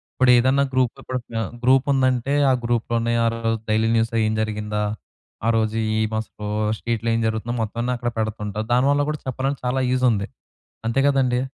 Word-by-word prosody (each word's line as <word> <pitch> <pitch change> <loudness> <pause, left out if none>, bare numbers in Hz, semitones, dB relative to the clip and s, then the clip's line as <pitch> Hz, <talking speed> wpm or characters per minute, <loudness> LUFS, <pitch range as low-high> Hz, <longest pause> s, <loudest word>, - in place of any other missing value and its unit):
ఇప్పుడేదన్నా 130 +2 +4
గ్రూప్‌తో 130 +1 0
కూడ 130 - -1 0.2
ఆహ్, 100 - -3
గ్రూప్ 130 +1 +4
ఉందంటే 130 0 +1 0.2
ఆ - - +4
గ్రూప్‌లోనే 115 0 0
ఆ - - +3
రోజు 115 -1 -1
డైలీ 110 +1 +2
న్యూస్ 115 0 +1 0.2
ఏం 110 - 0
జరిగిందా? 105 -1 -2 0.6
ఆ - - +4
రోజు 110 0 0 0.2
ఏమసలు 110 -1 -3 0.3
స్ట్రీట్‌లో 115 -1 -2
ఏం - - +1
జరుగుతుందో 110 +2 -2
మొత్తం 110 +2 -5
అన్నీ 125 +1 0
అక్కడ 120 0 -2
పెడుతుంటారు. 110 0 -3
దానివల్ల 140 +3 +3
కూడా 150 - -3
చెప్పాలంటే 135 +2 -2
చాలా 130 +1 0
యూజ్ 130 0 +2
ఉంది. 100 -1 -1 0.6
అంతే 120 +4 +1
కదండీ! 130 -3 +2
115 Hz, 165 wpm, -22 LUFS, 110-130 Hz, 0.6 s, ఇప్పుడేదన్నా